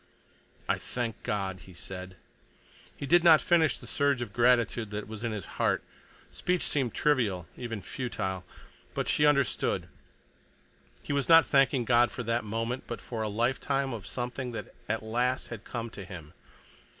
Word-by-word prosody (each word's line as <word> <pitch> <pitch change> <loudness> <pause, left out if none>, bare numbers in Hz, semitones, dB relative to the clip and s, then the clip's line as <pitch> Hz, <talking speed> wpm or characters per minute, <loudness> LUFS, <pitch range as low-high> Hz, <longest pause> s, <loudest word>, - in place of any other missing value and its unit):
"I - - +1
thank 120 -3 -4
God!" 95 -3 -2
he 95 - -13
said. 95 +1 -7 0.8
He - - -4
did 170 +4 +5
not 160 -3 +8
finish 165 -3 +3
the - - -10
surge 140 -2 +1
of 120 -4 -5
gratitude 120 -2 +3
that 105 0 -5
was 110 +1 -7
in 115 - -1
his 105 -4 -4 0.2
heart. - - +2 0.5
Speech 180 0 0
seemed 130 -6 +1
trivial, 110 - +1
even 115 -5 -5
futile. 95 -7 -3 0.5
But - - -1
she 150 - +4
understood. 140 -5 +1 1.2
He - - -3
was 140 +1 0
not 165 0 +9
thanking 135 -3 +3
God 120 +1 +5
for 125 - -5
that 115 0 0
moment, 115 +4 -3
but 120 - -4
for 115 -3 -5
a 110 - -1
lifetime 130 +4 0
of 105 -4 -6
something 125 0 -4
that - - -6 0.2
at 110 +1 -1
last 120 +3 0
had 115 -3 -7
come 115 -1 -5
to 100 - -8
him. 85 -5 -10
120 Hz, 165 wpm, -29 LUFS, 105-135 Hz, 1.2 s, not